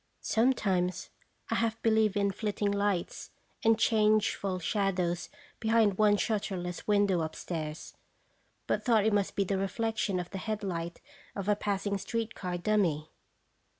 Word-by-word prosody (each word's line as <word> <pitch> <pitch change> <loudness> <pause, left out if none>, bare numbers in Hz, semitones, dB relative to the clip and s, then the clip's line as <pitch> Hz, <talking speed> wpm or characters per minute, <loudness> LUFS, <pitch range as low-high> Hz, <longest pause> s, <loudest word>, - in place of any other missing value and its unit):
Sometimes 195 -7 +1 0.4
I - - +2
half 225 -1 -1
believed 220 -2 +3
in 200 -1 +2
flitting 205 0 -1
lights 200 -3 -1 0.3
and 225 0 +5
changeful 215 -3 +2
shadows 180 -2 -1 0.3
behind 220 -3 +3
one 210 -1 +5
shutterless 190 -5 -2
window 200 -4 +3
upstairs, 160 -1 -5 0.7
but - - -1
thought 225 -4 +3
it 220 - +3
must 205 -2 +1
be 200 - +2
the 195 0 -1
reflection 205 0 -1
of 175 -1 -6
the 195 - -4
headlight 185 -6 -4 0.3
of 200 -1 -4
a 210 - +4
passing 200 -1 -1
street 230 +3 -3
car 180 -2 -4
dummy. 175 -6 0
200 Hz, 135 wpm, -30 LUFS, 185-215 Hz, 0.7 s, and